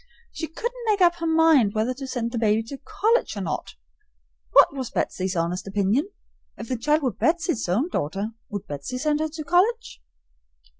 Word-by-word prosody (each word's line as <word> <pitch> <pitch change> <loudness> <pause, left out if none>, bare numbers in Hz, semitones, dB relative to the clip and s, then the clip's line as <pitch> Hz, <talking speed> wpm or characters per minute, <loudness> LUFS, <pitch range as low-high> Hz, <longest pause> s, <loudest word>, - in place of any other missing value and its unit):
She 320 - -5
couldn't 475 +9 -5
make 420 -2 +2
up 345 -1 +4
her 335 -1 -2
mind 320 -10 +4
whether 220 +4 +1
to 270 +1 -7
send 235 -3 -3
the 235 - -2
baby 220 0 +2
to 275 +5 -8
college 435 - 0
or - - -3
not. 175 - -4 0.8
What - - +6
was 260 -4 -4
Betsy's 185 0 -2
honest 170 +3 -2
opinion? 205 - +1 0.5
If 230 - -8
the 255 - 0
child 300 +5 +1
were 255 - +1
Betsy's 320 - 0
own 230 - +1
daughter, 195 - -2 0.2
would 205 -4 -5
Betsy 145 - -5
send 300 +2 0
her 315 0 -1
to 310 0 -7
college? 415 +9 +1
265 Hz, 185 wpm, -24 LUFS, 210-330 Hz, 0.8 s, What